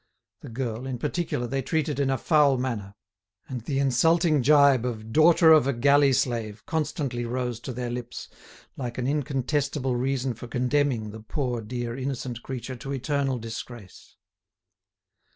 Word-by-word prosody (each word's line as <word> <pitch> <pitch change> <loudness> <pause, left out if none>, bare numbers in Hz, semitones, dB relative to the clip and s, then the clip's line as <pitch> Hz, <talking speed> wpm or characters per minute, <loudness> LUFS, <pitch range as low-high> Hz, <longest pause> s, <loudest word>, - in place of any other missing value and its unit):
The - - -10
girl, 120 0 -4
in 130 -2 -3
particular, 150 -1 -2
they 135 +3 -2
treated 150 +1 -1
in 140 -1 +1
a 135 - +1
foul 145 -4 +3
manner; 110 -6 -4 0.5
and 125 -3 -5
the 135 +4 -3
insulting 155 +4 +3
gibe 140 -2 +5
of 110 -3 -5
"daughter 160 +1 +6
of 150 -4 +5
a 140 - +1
galley 140 +3 +4
slave" 115 -4 -1
constantly 145 -6 -2
rose 120 -1 -3
to 130 - -6
their 125 0 -4
lips 120 0 -6 0.5
like 120 -3 -5
an 125 - -2
incontestable 140 -1 -1
reason 130 0 -1
for 120 - -10
condemning 125 -2 0
the 110 - -9
poor, 125 0 -3
dear 120 +1 -4
innocent 130 -2 -4
creature 130 0 -6
to 135 +4 -7
eternal 135 0 -1
disgrace. 115 -2 -9
130 Hz, 150 wpm, -26 LUFS, 120-140 Hz, 0.5 s, daughter